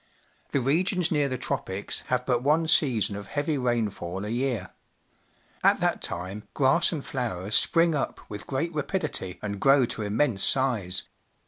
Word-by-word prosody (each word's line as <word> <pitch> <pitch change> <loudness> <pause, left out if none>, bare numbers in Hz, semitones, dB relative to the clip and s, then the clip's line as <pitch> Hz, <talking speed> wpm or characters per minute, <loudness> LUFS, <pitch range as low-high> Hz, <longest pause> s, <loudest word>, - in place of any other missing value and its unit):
The 140 - +1
regions 175 +6 +1
near 145 -3 +2
the 130 - -2
Tropics 100 -5 -4
have 125 0 0
but 125 -2 +1
one 155 +4 +2
season 125 -10 +3
of 100 -1 -7
heavy 145 +4 -1
rainfall 105 -7 -2
a - - -4
year. 120 -5 -2 0.9
At - - +4
that - - 0
time 95 +5 -4
grass 140 +5 +3
and 155 -5 -4
flowers 105 -6 -3
spring 165 +5 +4
up 145 - -2
with 105 - -8
great 155 +6 -2
rapid 160 +5 -2
ity 95 -11 -2
and 100 -1 -4
grow 135 -1 +5
to 115 - -4
immense 105 0 +1
size. 110 -9 +1
125 Hz, 160 wpm, -26 LUFS, 105-145 Hz, 0.9 s, grow